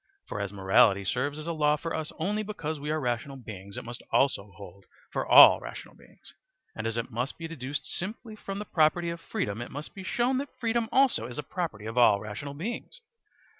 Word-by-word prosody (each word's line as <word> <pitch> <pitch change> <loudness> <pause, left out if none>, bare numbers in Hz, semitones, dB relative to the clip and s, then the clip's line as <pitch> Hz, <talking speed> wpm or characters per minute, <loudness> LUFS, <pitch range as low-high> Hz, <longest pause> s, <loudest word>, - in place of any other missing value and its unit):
For - - -4
as 100 -1 -3
morality 100 0 +4
serves 140 +8 -1
as 155 - -6
a 170 - -2
law 150 -1 +3
for 165 +2 -5
us 155 -1 -3
only 205 +6 -1
because 165 -8 -4
we 145 +1 -5
are 155 +1 0
rational 125 +1 -2
beings, 100 -5 -9
it - - -5
must 120 0 -7
also 105 -7 +2
hold 100 0 -12 0.3
for - - -1
all - - +10
rational - - -9
beings; - - -17 0.4
and 110 +1 -3
as 115 0 -3
it 115 +2 -3
must 125 +4 -3
be 165 - -5
deduced 145 -2 -5
simply 215 +4 -5
from 195 -2 -6
the 210 - -4
property 170 0 +2
of 170 0 -7
freedom, 105 +2 -3
it 120 - -6
must 145 +2 -7
be 190 - -8
shown 245 +6 +1
that 280 0 -7
freedom 230 -1 0
also 260 - +3
is 120 - -8
a 150 - -3
property 150 - -4
of 115 +3 -1
all 110 -4 +6
rational 110 +7 -6
beings. 235 - -5
145 Hz, 215 wpm, -28 LUFS, 115-175 Hz, 0.4 s, all